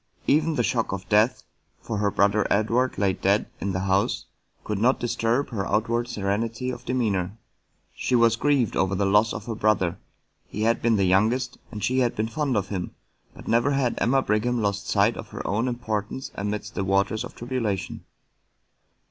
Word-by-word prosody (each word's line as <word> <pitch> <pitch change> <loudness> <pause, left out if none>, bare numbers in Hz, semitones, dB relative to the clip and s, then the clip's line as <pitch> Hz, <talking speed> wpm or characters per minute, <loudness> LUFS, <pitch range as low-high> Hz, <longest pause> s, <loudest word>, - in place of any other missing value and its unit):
Even 155 +2 +2
the 120 - +1
shock 115 -1 0
of 95 -1 -5
death 110 +4 +3 0.4
(for 110 -3 -4
her 105 -1 +2
brother 100 +1 +2
Edward 115 +5 +1
lay 95 -1 +2
dead 100 +3 +1
in 100 - -2
the 95 0 -2
house) 95 +1 +1 0.4
could 105 -2 -3
not 125 +5 +3
disturb 120 +3 0
her 100 -5 -3
outward 115 +2 0
serenity 110 +3 -2
of - - -8
demeanor. 105 -6 -1 0.6
She 125 - -1
was 115 -1 +4
grieved 135 -2 +1
over 95 0 +1
the 100 +1 +1
loss 105 +3 +4
of 110 -2 -6
her 115 - -3
brother: 100 -5 +1 0.5
he 105 - -4
had 115 +1 +2
been 115 -1 +3
the 100 -2 +2
youngest, 115 +8 +1
and 105 - -6
she 130 +1 +1
had 120 -2 +1
been 110 +1 -1
fond 140 -2 -1
of 100 - -2
him, 95 -3 -4 0.4
but - - -12
never 120 +5 +2
had 130 -3 +1
Emma 135 +2 +2
Brigham 120 +3 +1
lost 100 -1 -1
sight 105 +3 +3
of - - -7
her - - -7
own 110 +5 0
importance 120 0 -3
amidst 105 +2 -4
the 100 - -2
waters 100 +3 +1
of - - -9
tribulation. 120 -6 -3
110 Hz, 185 wpm, -25 LUFS, 100-120 Hz, 0.6 s, was